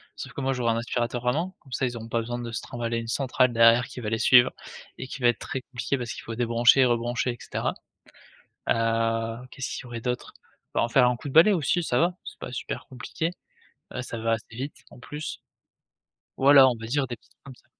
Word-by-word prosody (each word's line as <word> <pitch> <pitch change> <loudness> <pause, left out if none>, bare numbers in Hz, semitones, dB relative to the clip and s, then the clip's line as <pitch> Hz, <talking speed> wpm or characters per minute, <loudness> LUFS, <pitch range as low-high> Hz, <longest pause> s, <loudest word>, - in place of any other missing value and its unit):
Sauf - - -8
que 140 - -5
moi 135 0 +1
j'aurai 120 -2 +1
un - - -1
aspirateur 120 +1 -2
à 125 - +4
main, 175 +5 -2
comme 135 - -20
ça 130 - 0
ils 120 -1 -3
auront 115 0 -8
pas 115 - 0
besoin 120 +1 -4
de 120 -1 -5
se 115 - -3
trimbaler 115 -1 -3
une 115 0 -4
centrale 130 -1 +1
derrière 115 +1 +6
qui 125 - -9
va 105 - -3
les 115 - 0
suivre 120 -2 +6 0.5
et 130 - -6
qui 135 - -8
va 120 - +5
être 120 - +2
très 130 - -4
compliqué 130 +2 -3
parce 120 -1 -4
qu'il - - -9
faut 115 - -6
débrancher, 120 +2 +5
rebrancher, 120 +1 0
et 120 - -8
cetera. - - -3 0.9
Heu, 115 +1 0
qu'est-ce 135 - -5
qu'il - - -6
y - - -11
aurait 120 -1 -6
d'autre? 125 0 -4 0.4
Bah, - - +1
en 120 - +1
faire 125 0 +5
un 125 - 0
coup 145 - -11
de - - -6
balai 170 +7 +8
aussi 175 0 +1
ça 125 -6 0
va, 175 +2 +2
c'est - - -9
pas - - -7
super - - -5
compliqué, 135 +6 -4 0.6
heu, 130 - -3
ça 120 -2 -6
va 115 0 0
assez 115 0 -5
vite 135 +4 -7
en - - -15
plus 150 +5 -6 1.0
voilà 135 0 +8
on 125 - +1
va 115 0 -8
dire 135 +3 0
des 120 - -6
petits - - -30
t - - -31
comme 135 -2 -10
ça. - - -25
120 Hz, 245 wpm, -26 LUFS, 115-130 Hz, 1.0 s, balai